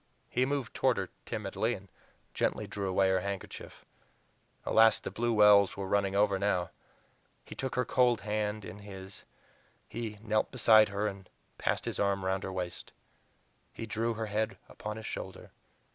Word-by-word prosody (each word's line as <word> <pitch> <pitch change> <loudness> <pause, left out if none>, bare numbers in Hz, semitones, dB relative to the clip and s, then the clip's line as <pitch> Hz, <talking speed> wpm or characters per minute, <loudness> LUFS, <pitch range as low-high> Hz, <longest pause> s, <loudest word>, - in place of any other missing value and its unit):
He 125 +1 +2
moved 140 -3 -2
toward 130 -2 +2
her 95 -2 -2 0.2
timidly, - - -1
and - - -12 0.5
gently - - 0
drew 100 -2 -3
away 95 +1 +3
her 95 0 +3
handkerchief. 100 +1 -6 0.8
Alas! 110 -1 +5
the - - -6
blue 120 +1 0
wells 105 -3 +6
were 100 - -3
running 100 0 +1
over 100 -1 +3
now. 95 -3 0 0.7
He - - -9
took 130 -1 -4
her 125 - +1
cold 120 -4 +3
hands 105 0 -2
in 100 - -8
his; 95 -2 -10 0.6
he 115 -3 -5
knelt 110 -1 +1
beside 110 -4 +6
her 100 +1 -1
and 95 -3 -5 0.3
passed - - 0
his - - -3
arm 100 -1 +1
around 95 0 0
her 95 - -4
waist. 90 -2 -5 0.8
He 115 - -5
drew 115 +1 -1
her 110 0 -2
head 105 -1 -1
upon 105 0 -6
his 110 - -8
shoulder. - - -6
105 Hz, 165 wpm, -31 LUFS, 95-110 Hz, 0.8 s, wells